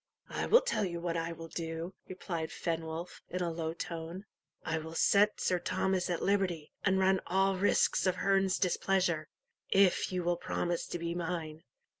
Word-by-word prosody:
"I - - -2
will 480 - +7
tell - - 0
you 170 -3 -2
what 170 -1 -2
I 165 0 -1
will 165 0 -8
do," 165 +2 -4
replied 170 -4 -4
Fenwolf, 165 +1 -4
in 180 0 -2
a 170 - -1
low 160 -1 -2
tone; 170 +4 -6 0.4
"I 160 -1 0
will 160 +1 -8
set 205 +4 +4
Sir 180 - +1
Thomas 185 0 0
at 175 - -1
liberty, 190 -6 0
and 190 -1 +3
run 190 0 +3
all 195 +1 +2
risks 190 0 +3
of 185 - +2
Herne's 195 0 +2
displeasure, 180 -3 +1 0.4
if 195 -1 +4
you 180 -1 -1
will 175 0 +1
promise 175 -1 -2
to - - -3
be 170 0 -3
mine." 165 -2 -4
175 Hz, 175 wpm, -32 LUFS, 165-190 Hz, 0.4 s, will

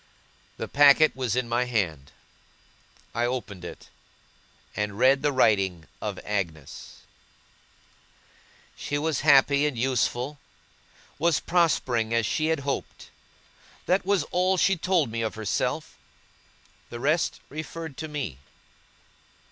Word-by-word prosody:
The - - -4
packet 145 +2 +5
was 125 -4 -1
in 125 -1 0
my 120 +2 0
hand. 85 - -2 1.0
I 120 +1 0
opened 120 -7 -5
it, 90 - -10 0.9
and 105 -1 -3
read 130 +3 +4
the 145 - +1
writing 95 - +2 0.2
of - - -4
Agnes. 85 -9 -5 1.7
She 145 - -3
was 150 -2 -1
happy 140 0 +5
and 140 -5 -4
useful, 130 +3 -1 0.8
was 165 -1 +2
prospering 125 -10 +1
as 115 -1 +2
she 155 +8 0
had 160 -2 0
hoped. 140 0 -5 0.7
That 185 +2 +2
was 195 0 +1
all 185 +1 +2
she 195 +2 +3
told 175 -7 +1
me 115 0 -3
of 110 0 -2
herself. 110 -2 -2 0.9
The 120 - -7
rest 155 +6 0
referred 155 0 -7
to 160 - -5
me. 140 - -5
130 Hz, 120 wpm, -26 LUFS, 110-155 Hz, 1.7 s, packet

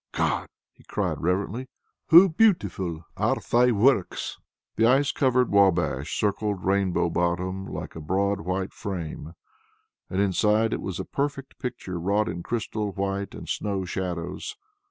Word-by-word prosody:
"God!" - - 0 0.3
he - - -22
cried - - -2
reverently. 100 +9 -1 0.4
"Hoo 175 +4 +9
beautifu' 100 - +1
are - - +2 0.2
Thy 125 +1 +5
works." 115 -2 +1 0.4
The 115 - +4
ice 135 +3 +4
covered 125 -2 +2
Wabash 90 -8 +2
circled 105 -2 -1
Rainbow 95 -2 +2
Bottom 90 +3 -1
like - - -6
a 80 - -6
broad 100 +5 0
white 95 +2 -2
frame, 85 -4 -5 0.8
and 95 - -2
inside 105 +3 +2
it - - -2
was 95 -2 -4
a 95 - -3
perfect 140 -1 -3
picture 110 -8 -5
wrought 100 +5 +1
in 85 - -4
crystal 110 0 -3
white 100 0 -3
and - - -9
snow 100 -2 -2
shadows. 90 - -4
100 Hz, 140 wpm, -26 LUFS, 90-115 Hz, 0.8 s, Hoo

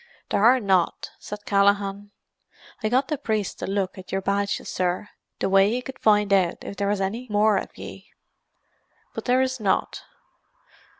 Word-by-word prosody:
"There 200 - +1
are 250 +3 +6
not," 190 -5 +1
said 210 0 -8
Callaghan. 200 0 +1 0.7
"I 215 - 0
got 260 +4 +2
the 300 -3 -2
priest 215 -3 -2
to - - -4
look 195 -1 -2
at 185 - -11
your 195 - 0
badges, 200 +1 -1
sir, 180 +2 -2 0.3
the - - -1
way 195 +1 +5
he 245 +3 -2
could 265 - -9
find 210 -2 +3
out 185 -3 +2
if - - -7
there 200 - -1
was 205 0 0
anny 225 +6 -3
more 210 0 +3
of - - -5
ye. - - -10 1.0
But - - -6
there 255 +1 +3
is 260 -1 -2
not. 200 -3 0
205 Hz, 175 wpm, -24 LUFS, 195-220 Hz, 1.0 s, are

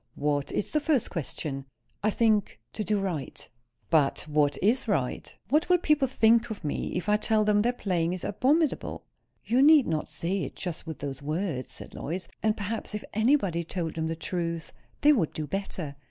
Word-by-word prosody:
"What 145 -1 -1
is - - -2
the 305 - +2
first 295 -5 +1
question?" 135 -3 -4 0.4
"I 215 - +2
think 215 - +1
to 215 - -3
do 210 +2 +1
right." 180 -8 -4 0.4
"But 150 -4 +3
what 150 -1 +2
is 230 +6 +2
right? 135 - -1 0.2
What 305 +7 +2
will 360 - +6
people 300 -5 +2
think 235 -1 +4
of 215 -4 -6
me, 150 - -3
if 180 - -4
I 210 0 +4
tell 215 0 +2
them 210 0 +4
their 240 +3 +2
playing 180 -7 -1
is 185 - -5
abominable?" 275 +9 +1 0.4
"You 245 +3 +3
need 295 -1 +7
not 155 -2 -2
say 170 +5 -2
it - - -5
just 175 -3 -5
with 160 - -5
those 140 -1 -5
words," 155 -2 -2
said - - -10
Lois. 180 +5 -4
"And 215 0 +1
perhaps, 210 +1 -3
if 210 - -4
anybody 220 - +2
told 165 -1 -3
them 160 0 -2
the 165 - -2
truth, 165 0 -3 0.3
they 300 +1 +7
would 185 - 0
do 155 - -3
better. 175 -5 -4
195 Hz, 190 wpm, -28 LUFS, 160-225 Hz, 0.4 s, need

